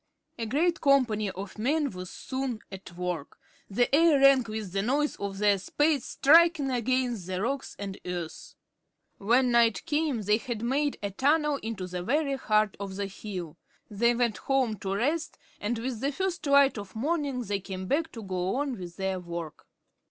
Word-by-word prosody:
A 230 - -2
great 330 +8 +1
company 240 -8 +3
of 190 +2 -8
men 290 +5 +1
was 180 -1 -7
soon 260 -3 -4
at 185 -2 -10
work. 180 -5 -4 0.3
The 240 +6 +1
air 320 -2 +5
rang 275 -1 +7
with 215 -3 -5
the 195 +1 0
noise 285 +7 0
of 200 -1 -4
their 205 -1 +3
spades 295 +6 +1
striking 320 -1 +4
against 245 -5 0
the 185 -1 -2
rocks 270 +6 -2
and 195 -1 -6
earth. 175 -3 -6 0.6
When 245 +5 +3
night 235 -2 +3
came 295 -7 0
they 210 +2 +3
had 235 -2 -5
made 285 +4 0
a 200 - -2
tunnel 295 +6 +2
into 220 -4 -4
the 180 0 -5
very 275 - 0
heart 215 -5 +1
of 195 -1 -5
the 200 +1 -2
hill. 185 -5 -7 0.3
They 235 +4 +2
went 235 -3 +1
home 255 -6 0
to 195 0 -2
rest, 300 +10 -1 0.2
and 225 +3 -2
with 235 0 -3
the 275 +4 0
first 365 0 -3
light 280 -4 +5
of 200 0 -10
morning 280 0 -1
they 205 -2 -2
came 190 -1 -6
back 315 - 0
to 225 - -7
go 185 0 -2
on 275 -4 -2
with 175 -1 -8
their 190 -1 -1
work. 170 -3 -7
230 Hz, 180 wpm, -28 LUFS, 195-275 Hz, 0.6 s, rang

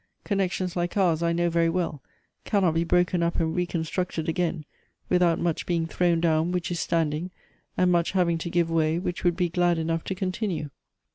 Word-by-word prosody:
Connections 190 -3 -1
like 175 +2 -2
ours, 170 -5 +2
I 170 0 +1
know 170 0 +1
very 165 0 +2
well, 165 -5 -2 0.4
cannot 190 -6 +2
be 165 +1 +1
broken 175 +1 +2
up 170 0 0
and 160 -1 0
reconstructed 175 -1 -2
again 165 -2 -1 0.4
without 180 -2 +3
much 170 -2 -2
being 170 -2 0
thrown 170 0 +1
down 165 0 +2
which 180 -1 -2
is 170 - -2
standing, 165 +1 0 0.5
and 180 0 +3
much 170 0 +1
having 170 -3 +2
to 170 - -4
give 170 -1 +1
way 160 0 +2
which 175 0 -3
would 175 -1 +2
be 180 -1 +2
glad 175 0 +1
enough 165 0 -1
to 190 - -3
continue. 185 -5 -3
170 Hz, 190 wpm, -26 LUFS, 165-180 Hz, 0.5 s, without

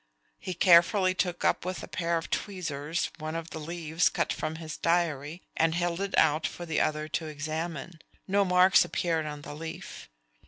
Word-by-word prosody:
He 185 - -5
carefully 185 +2 +5
took 180 -1 -1
up - - +2
with 180 -3 -4
a - - -7
pair 170 -1 -1
of 165 - -6
tweezers 165 -5 -2
one 155 +1 -4
of 165 0 -5
the 160 - -5
leaves 165 +1 0
cut - - -1
from 155 - -3
his 160 -1 -6
diary, 165 -1 0
and 165 0 +2
held 175 +1 -1
it 200 0 -2
out 155 0 +4
for 175 - -7
the 160 -2 0
other 155 0 0
to 160 +1 -2
examine. 155 +2 -5 0.3
No 200 +1 +3
marks 180 0 +5
appeared 165 -3 -1
on 150 -1 -7
the - - -7
leaf. 165 - -8
165 Hz, 185 wpm, -29 LUFS, 155-180 Hz, 0.3 s, carefully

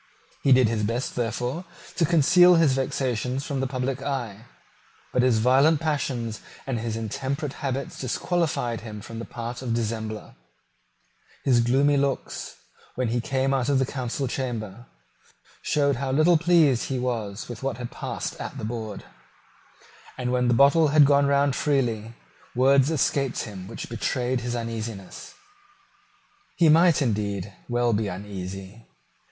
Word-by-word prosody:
He 135 - +2
did 130 -2 +6
his 110 -1 -1
best, 115 +4 -2
therefore, 125 +6 -2 0.3
to 170 - +2
conceal 175 +3 +6
his 165 -5 +4
vexations 130 -1 -1
from 140 -3 -3
the 135 - 0
public 130 0 -3
eye. 120 -6 -4 0.7
But 125 - +3
his 125 -3 +3
violent 135 +7 +4
passions 130 -8 -2 0.2
and 130 -4 -2
his 110 0 -3
intemperate 135 +6 -3
habits 135 -1 -3
disqualified 130 -3 -1
him 105 -2 -8
for 115 - -11
the 115 0 -5
part 120 +1 -6
of 130 - -5
a - - +1
dissembler. 110 -2 -3 1.1
His 125 -3 +4
gloomy 135 +5 +3
looks, 140 -1 -2 0.4
when 125 -2 -1
he 120 +1 0
came 135 0 0
out 130 -1 0
of 140 - +3
the 130 - +2
council 130 +1 -3
chamber, 120 -4 -4 0.7
showed 140 -3 +1
how 135 0 -2
little 155 +6 +4
he 170 0 +4 0.3
was 115 -5 -2
pleased - - -7
with 120 -3 -8
what 135 0 -2
had 120 -1 -6
passed - - -5
at - - -6
the - - -4
board; 110 -2 -5 1.1
and, 125 -1 -2
when 125 -1 +1
the 120 - +3
bottle 140 +5 +5
had 145 0 +6
gone 140 0 +4
round 140 -1 +2
freely, 120 -6 0 0.4
words 135 +2 +4
escaped 140 -3 0
him 95 -4 -8
which 115 - -7
betrayed 125 +2 -1
his 120 0 -3
uneasiness. 115 - -6 1.2
He 165 -2 +4
might, 165 -1 +5
indeed, 100 -4 -2 0.2
well 120 -1 +1
be 105 0 0
uneasy. 95 +2 -7
125 Hz, 150 wpm, -25 LUFS, 115-140 Hz, 1.2 s, did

